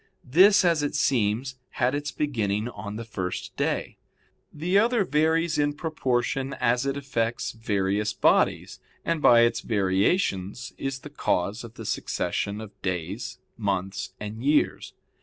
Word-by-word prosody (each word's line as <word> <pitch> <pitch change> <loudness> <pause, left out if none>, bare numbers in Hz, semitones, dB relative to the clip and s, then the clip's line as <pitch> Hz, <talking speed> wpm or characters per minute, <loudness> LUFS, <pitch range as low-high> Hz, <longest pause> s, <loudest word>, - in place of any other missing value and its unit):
This, 190 +8 +6
as 165 -3 +3
it 145 - -2
seems, 125 +2 +1 0.2
had 125 0 +1
its 145 +1 -2
beginning 110 -7 -1
on 105 -2 -7
the 115 - -5
first 95 -4 -5
day. - - -2 0.5
The 180 +6 +2
other 230 -2 +2
varies 160 +2 +2
in 145 0 +2
proportion 135 -4 -1
as 125 +2 +1
it 135 0 -1
affects 120 -4 -2
various 105 -1 -1
bodies, - - +2 0.3
and 165 -2 0
by 120 -4 +7
its 115 0 +3
variations 100 - 0
is 135 -1 -3
the 150 - -10
cause 105 -5 -1
of 115 0 -11
the - - -8
succession 100 +1 -2
of 110 -2 -9
days, 90 +4 -3 0.2
months, 95 -1 -2
and 105 +2 -6
years. 145 +2 +1
120 Hz, 140 wpm, -26 LUFS, 105-145 Hz, 0.5 s, by